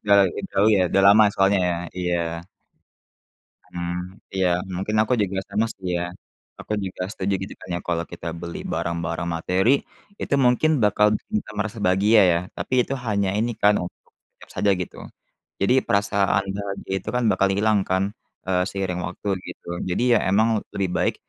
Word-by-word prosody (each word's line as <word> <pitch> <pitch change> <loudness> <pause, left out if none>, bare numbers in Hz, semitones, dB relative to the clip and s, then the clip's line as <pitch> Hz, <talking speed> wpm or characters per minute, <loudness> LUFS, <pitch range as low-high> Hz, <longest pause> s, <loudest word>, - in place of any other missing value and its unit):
Sudah 100 -1 +5
lagi 95 - -1
jauh 100 +2 +3
ya, - - +3
sudah 95 - +2
lama 105 +2 +7
soalnya 100 +1 +3
ya? 85 - 0 0.2
Iya. 85 0 -2 1.2
Mhm, 85 0 -4 0.4
iya. 95 -1 +2 0.3
Mungkin 100 +4 -2
aku 110 - -1
juga 95 -1 -2
sama 105 +3 +1
sih 95 - -10
ya. 85 - -2 0.6
Aku - - -6
juga 90 0 -4
setuju, 100 -2 -2
gitu - - -6
kan - - -12
ya, 85 - -1
kalau 85 -1 0
kita 85 0 -8
beli 85 0 -6
barang-barang 85 0 -2
materi, 90 +7 +1 0.5
itu - - -2
mungkin 135 +3 +3
bakal 105 0 +4 0.2
bisa 105 - -2
merasa 110 +2 -3
bahagia, 105 +3 +4
ya. 85 - +1 0.2
Tapi 130 -1 +1
itu 135 - -4
hanya 100 -2 +1
ini 115 +2 0
kan 105 0 +4
untuk 90 - -5 0.2
sekejap - - -21
saja, 100 -1 +2
gitu. 90 -1 -6 0.6
Jadi, 100 +6 +2
perasaan 100 0 +1
bahagia 100 -1 -5
itu - - -6
kan 125 - +1
bakal 95 +1 +2
hilang 105 +2 +2
kan, 95 +1 +2 0.4
eee, 90 -1 +1
seiring 95 -2 -3
waktu, - - -6 0.2
gitu. 85 0 -7
Jadi, 90 - 0
ya, - - +6
memang 110 +2 +3
lebih 95 -2 -1
baik - - +1
95 Hz, 170 wpm, -23 LUFS, 90-105 Hz, 1.2 s, lama